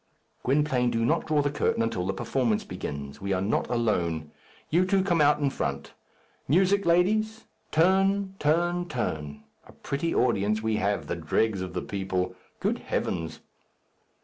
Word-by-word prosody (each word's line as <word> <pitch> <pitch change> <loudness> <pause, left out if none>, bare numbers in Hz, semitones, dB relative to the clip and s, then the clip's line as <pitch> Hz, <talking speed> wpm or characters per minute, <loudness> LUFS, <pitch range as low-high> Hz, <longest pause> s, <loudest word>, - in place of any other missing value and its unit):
"Gwynplaine, 135 -2 +2
do 115 -1 0
not 160 +6 +1
draw 150 -2 +2
the 145 - 0
curtain 145 -5 +1
until 115 -6 -1
the 95 - 0
performance 115 +2 0
begins. 70 0 -6
We 100 0 -1
are 90 - +1
not 100 +3 0
alone. 85 -10 0 0.4
You 170 +4 +4
two 190 0 +2
come 175 -4 +2
on 150 0 +4
in 140 - +3
front. 70 - -3 0.5
Music, 190 +6 +3
ladies! 215 +6 +2 0.3
turn, 190 +3 +3
turn, 175 +3 +1
turn. 75 -11 -3 0.2
A - - -14
pretty 150 +4 -3
audience 105 -3 +2
we 110 -1 +1
have! 100 +1 0
the - - -3
dregs 95 +5 0
of 90 -2 -5
the 90 - -2
people. 95 -2 -2 0.3
Good - - 0
heavens!" 80 -2 -3
125 Hz, 155 wpm, -27 LUFS, -, 0.5 s, You